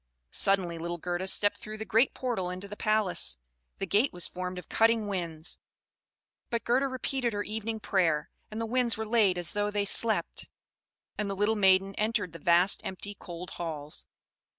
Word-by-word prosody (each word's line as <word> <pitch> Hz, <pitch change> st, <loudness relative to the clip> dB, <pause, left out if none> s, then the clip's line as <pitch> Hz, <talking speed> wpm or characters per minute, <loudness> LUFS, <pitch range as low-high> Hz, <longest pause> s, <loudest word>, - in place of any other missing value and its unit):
Suddenly 185 Hz, -4 st, +2 dB
little 170 Hz, +1 st, -3 dB
Gerda 175 Hz, +2 st, -3 dB
stepped 205 Hz, +1 st, +2 dB
through 215 Hz, 0 st, -7 dB
the 220 Hz, -, -5 dB
great 225 Hz, +5 st, +3 dB
portal 230 Hz, -8 st, -2 dB
into 185 Hz, +2 st, -6 dB
the 210 Hz, -, -7 dB
palace. 215 Hz, -, +1 dB, 0.4 s
The -, -, -2 dB
gate 210 Hz, +8 st, +3 dB
was 175 Hz, -1 st, -2 dB
formed 180 Hz, 0 st, -5 dB
of 180 Hz, -, -8 dB
cutting 225 Hz, -1 st, +3 dB
winds; 170 Hz, -5 st, -3 dB, 0.9 s
but 235 Hz, -1 st, -1 dB
Gerda 260 Hz, +4 st, +2 dB
repeated 260 Hz, -2 st, -1 dB
her 205 Hz, 0 st, -1 dB
evening 220 Hz, +1 st, -3 dB
prayer, 170 Hz, -8 st, +1 dB, 0.2 s
and 215 Hz, -, -6 dB
the 230 Hz, -, -1 dB
winds 235 Hz, -1 st, 0 dB
were 220 Hz, -, -3 dB
laid 215 Hz, -5 st, +3 dB
as 175 Hz, -1 st, +1 dB
though 205 Hz, 0 st, 0 dB
they 205 Hz, -1 st, 0 dB
slept; 220 Hz, +2 st, +1 dB, 0.7 s
and 210 Hz, -1 st, -1 dB
the 195 Hz, -, -2 dB
little 205 Hz, +3 st, +2 dB
maiden 195 Hz, -1 st, +4 dB
entered 215 Hz, -5 st, 0 dB
the 165 Hz, -, -9 dB
vast, 175 Hz, +5 st, +4 dB
empty, 195 Hz, +2 st, -5 dB
cold 175 Hz, -2 st, -9 dB
halls. 155 Hz, -3 st, -5 dB
200 Hz, 175 wpm, -29 LUFS, 180-220 Hz, 0.9 s, maiden